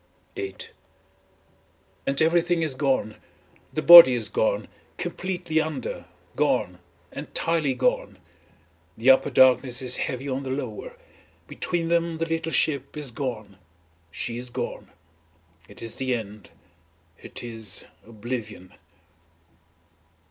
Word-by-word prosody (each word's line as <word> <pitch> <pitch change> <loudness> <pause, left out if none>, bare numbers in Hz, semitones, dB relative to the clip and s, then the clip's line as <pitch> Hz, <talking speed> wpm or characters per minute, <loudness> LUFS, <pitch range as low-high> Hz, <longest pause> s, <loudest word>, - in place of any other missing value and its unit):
VIII 95 -1 -7 1.4
And 135 0 0
everything 170 +1 +2
is 155 -4 -1
gone, 130 -6 -1 0.5
the 155 - -3
body 170 -7 +11
is 120 - -2
gone - - 0 0.3
completely 175 -4 -2
under, 155 -5 -5 0.3
gone, 90 0 0 0.3
entirely 150 -1 -1
gone. - - -1 0.8
The 120 +4 +6
upper 130 - +3
darkness 125 -1 +4
is 125 -1 +1
heavy 130 +2 -3
as 135 0 -2
the 135 - -6
lower, 475 - -5 0.5
between 170 -2 -3
them 170 -1 0
the 165 - -1
little 165 0 -3
ship 140 -3 0
is 145 -4 -4
gone 110 -6 -6 0.5
It 85 -7 -8
is 115 - -4
the 130 -1 0
end, 105 -3 -8 0.7
it - - -8
is 115 -4 -5 0.2
oblivion. 110 -4 -7
130 Hz, 105 wpm, -25 LUFS, 115-160 Hz, 1.4 s, body